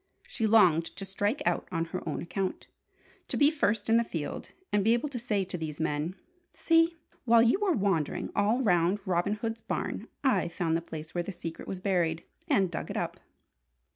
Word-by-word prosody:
She 225 Hz, -, -1 dB
longed 180 Hz, -7 st, +5 dB
to 195 Hz, -, -6 dB
strike 205 Hz, +6 st, -1 dB
out -, -, 0 dB
on 165 Hz, -2 st, 0 dB
her 185 Hz, -, -2 dB
own -, -, -3 dB
account, 185 Hz, +2 st, -3 dB, 0.6 s
to -, -, -2 dB
be 290 Hz, +1 st, +5 dB
first 215 Hz, -9 st, 0 dB
in 225 Hz, +1 st, +5 dB
the 235 Hz, -, +3 dB
field, 165 Hz, -9 st, -5 dB, 0.2 s
and 205 Hz, -1 st, +3 dB
be 225 Hz, +3 st, +4 dB
able 255 Hz, +5 st, -2 dB
to 255 Hz, -3 st, -4 dB
say 210 Hz, -5 st, 0 dB
to 180 Hz, -1 st, -5 dB
these 155 Hz, -2 st, -5 dB
men: 160 Hz, +2 st, -1 dB, 0.4 s
"See, 330 Hz, 0 st, +3 dB, 0.3 s
while 230 Hz, -1 st, +6 dB
you 240 Hz, +11 st, +3 dB
were 405 Hz, -4 st, +2 dB
wandering 195 Hz, -, 0 dB
all 215 Hz, +6 st, +2 dB
round 180 Hz, -1 st, +3 dB
Robin 185 Hz, +2 st, +1 dB
Hood's 225 Hz, +1 st, -4 dB
barn, -, -, -3 dB, 0.2 s
I've 255 Hz, -10 st, +2 dB
found 165 Hz, -3 st, 0 dB
the 165 Hz, -, 0 dB
place 155 Hz, -1 st, -8 dB
where 175 Hz, -, -1 dB
the 200 Hz, -, -5 dB
secret 165 Hz, -3 st, -7 dB
was 190 Hz, -, -4 dB
buried, 175 Hz, -4 st, 0 dB, 0.2 s
and 190 Hz, -3 st, +2 dB
dug -, -, -4 dB
it -, -, -3 dB
up!" -, -, -3 dB
195 Hz, 200 wpm, -29 LUFS, 170-225 Hz, 0.6 s, while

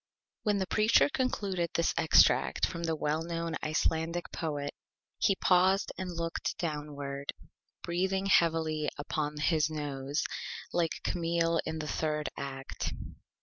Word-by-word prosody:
When 210 Hz, -2 st, +1 dB
the 190 Hz, -, 0 dB
Preacher 215 Hz, +8 st, +4 dB
concluded 200 Hz, -, -1 dB
this 170 Hz, -, +2 dB
Extract -, -, +4 dB
from 170 Hz, 0 st, -4 dB
the 165 Hz, -1 st, 0 dB
Well 155 Hz, +1 st, 0 dB
Known 165 Hz, -1 st, -3 dB
Icelandic 160 Hz, +2 st, 0 dB
Poet 145 Hz, -3 st, -3 dB, 0.5 s
he 195 Hz, -, +3 dB
paused 190 Hz, +2 st, +3 dB
and 185 Hz, -1 st, -4 dB
looked 165 Hz, -1 st, -3 dB
downward, 145 Hz, -3 st, -4 dB, 0.5 s
breathing 190 Hz, +3 st, 0 dB
heavily 160 Hz, -4 st, +3 dB, 0.2 s
through 150 Hz, -1 st, -1 dB
his 155 Hz, -1 st, +3 dB
Nose, 145 Hz, -1 st, -2 dB, 0.5 s
like 170 Hz, -2 st, 0 dB
Camille 170 Hz, -1 st, +1 dB
in 160 Hz, -, -2 dB
the 155 Hz, -1 st, -4 dB
Third 150 Hz, 0 st, -1 dB
Act. 135 Hz, -1 st, -5 dB
165 Hz, 125 wpm, -31 LUFS, 150-175 Hz, 0.5 s, Preacher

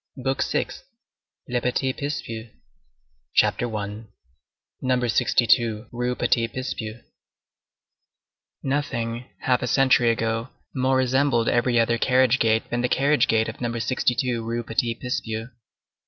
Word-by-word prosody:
BOOK 135 Hz, 0 st, -1 dB
SIXTH—LE 125 Hz, -1 st, -5 dB
PETIT 130 Hz, +2 st, -1 dB
PICPUS 145 Hz, +1 st, -3 dB, 1.1 s
CHAPTER 120 Hz, -2 st, +2 dB
I—NUMBER 105 Hz, -, -5 dB
62 115 Hz, -1 st, +2 dB
RUE 125 Hz, +1 st, -1 dB
PETIT 115 Hz, -2 st, +1 dB
PICPUS 120 Hz, -3 st, -5 dB, 1.6 s
Nothing, 120 Hz, -4 st, -2 dB, 0.2 s
half 125 Hz, -1 st, +2 dB
a 125 Hz, -, -1 dB
century 125 Hz, -2 st, +4 dB
ago, 115 Hz, +1 st, -1 dB, 0.2 s
more 130 Hz, 0 st, +2 dB
resembled 130 Hz, -2 st, +2 dB
every 120 Hz, 0 st, +2 dB
other 115 Hz, 0 st, +2 dB
carriage 130 Hz, 0 st, +3 dB
gate 110 Hz, 0 st, +2 dB
than 120 Hz, 0 st, 0 dB
the 125 Hz, -, 0 dB
carriage 145 Hz, +4 st, +3 dB
gate 110 Hz, 0 st, +2 dB
of 110 Hz, -, -7 dB
Number 120 Hz, -1 st, -2 dB
62 125 Hz, 0 st, 0 dB
Rue 115 Hz, +1 st, -2 dB
Petit 115 Hz, 0 st, -1 dB
Picpus. 115 Hz, -1 st, -4 dB
120 Hz, 115 wpm, -24 LUFS, 115-130 Hz, 1.6 s, century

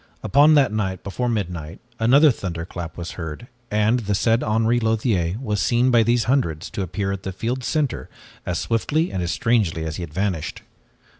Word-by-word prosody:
Upon 145 Hz, +3 st, +5 dB
that 135 Hz, -6 st, +4 dB
night 95 Hz, -4 st, -2 dB
before 120 Hz, +5 st, -2 dB
midnight, 90 Hz, -7 st, -3 dB, 0.2 s
another 135 Hz, +7 st, +6 dB
thunderclap 85 Hz, -4 st, -6 dB
was 85 Hz, -1 st, -5 dB
heard 80 Hz, +6 st, -7 dB, 0.2 s
and 105 Hz, +3 st, +2 dB
the 105 Hz, -3 st, -1 dB
said 115 Hz, +4 st, +2 dB
Henri 115 Hz, +2 st, +2 dB
Lothiere 110 Hz, -6 st, 0 dB
was 105 Hz, -6 st, -2 dB
seen 125 Hz, +2 st, +2 dB
by 120 Hz, -2 st, +5 dB
these 120 Hz, +1 st, +2 dB
hundreds 100 Hz, -, 0 dB
to -, -, -4 dB
appear 95 Hz, +2 st, -2 dB
at 100 Hz, -1 st, -4 dB
the 95 Hz, -, -4 dB
field's 120 Hz, +7 st, -3 dB
center 150 Hz, -5 st, -1 dB, 0.3 s
as 90 Hz, -, -2 dB
swiftly 150 Hz, +9 st, 0 dB
and 95 Hz, -, -2 dB
as 85 Hz, -, -2 dB
strangely 95 Hz, -5 st, +1 dB
as 80 Hz, -1 st, -4 dB
he -, -, -5 dB
had 85 Hz, -3 st, -6 dB
vanished. 95 Hz, -2 st, -3 dB
105 Hz, 180 wpm, -22 LUFS, 90-120 Hz, 0.3 s, another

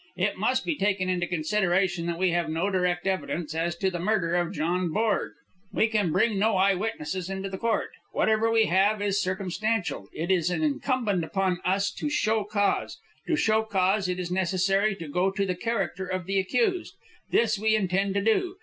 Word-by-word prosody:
It -, -, 0 dB
must -, -, 0 dB
be 340 Hz, -, 0 dB
taken 195 Hz, -5 st, 0 dB
into 175 Hz, -1 st, 0 dB
consideration 175 Hz, 0 st, 0 dB
that 170 Hz, -1 st, -2 dB
we 185 Hz, 0 st, +2 dB
nave 170 Hz, -1 st, 0 dB
no 165 Hz, +6 st, -1 dB
direct 180 Hz, -1 st, 0 dB
evidence 175 Hz, -4 st, -2 dB
as 165 Hz, +1 st, -1 dB
to 190 Hz, +2 st, 0 dB
the 175 Hz, -, -4 dB
murder 180 Hz, -3 st, 0 dB
of 175 Hz, -1 st, 0 dB
John 175 Hz, +3 st, -1 dB
Borg. 220 Hz, +3 st, 0 dB, 0.4 s
We 220 Hz, -, +2 dB
can 210 Hz, -6 st, +1 dB
bring 210 Hz, +3 st, +2 dB
no 215 Hz, -1 st, +2 dB
eye 195 Hz, +1 st, +4 dB
witnesses 185 Hz, -2 st, -3 dB
into 195 Hz, 0 st, -4 dB
court. 225 Hz, +2 st, -1 dB, 0.2 s
Whatever 220 Hz, +1 st, +2 dB
we 225 Hz, -1 st, +4 dB
have 200 Hz, +4 st, +2 dB
is 205 Hz, 0 st, 0 dB
circumstantial. 195 Hz, +3 st, -2 dB
It 170 Hz, +4 st, -3 dB
is 180 Hz, -2 st, +2 dB
incumbent 255 Hz, -, 0 dB
upon 185 Hz, +1 st, -1 dB
us 195 Hz, +2 st, +1 dB
to 300 Hz, -, -4 dB
show 220 Hz, -6 st, +1 dB
cause. 205 Hz, -1 st, 0 dB, 0.3 s
To 325 Hz, -, +2 dB
show 220 Hz, -6 st, +2 dB
cause 195 Hz, -2 st, +1 dB
it 180 Hz, -, -1 dB
is 180 Hz, -1 st, -4 dB
necessary 190 Hz, +3 st, +1 dB
to 165 Hz, -4 st, -8 dB
go 180 Hz, +6 st, +1 dB
into 195 Hz, +1 st, 0 dB
the 185 Hz, -, -1 dB
character 190 Hz, -2 st, -2 dB
of 185 Hz, -1 st, -3 dB
the 195 Hz, +1 st, +1 dB
accused. 365 Hz, -, 0 dB, 0.3 s
This 220 Hz, -3 st, +2 dB
we 220 Hz, +1 st, +3 dB
intend 195 Hz, -1 st, 0 dB
to 200 Hz, -, +2 dB
do. 360 Hz, -, +1 dB
195 Hz, 190 wpm, -26 LUFS, 180-215 Hz, 0.4 s, eye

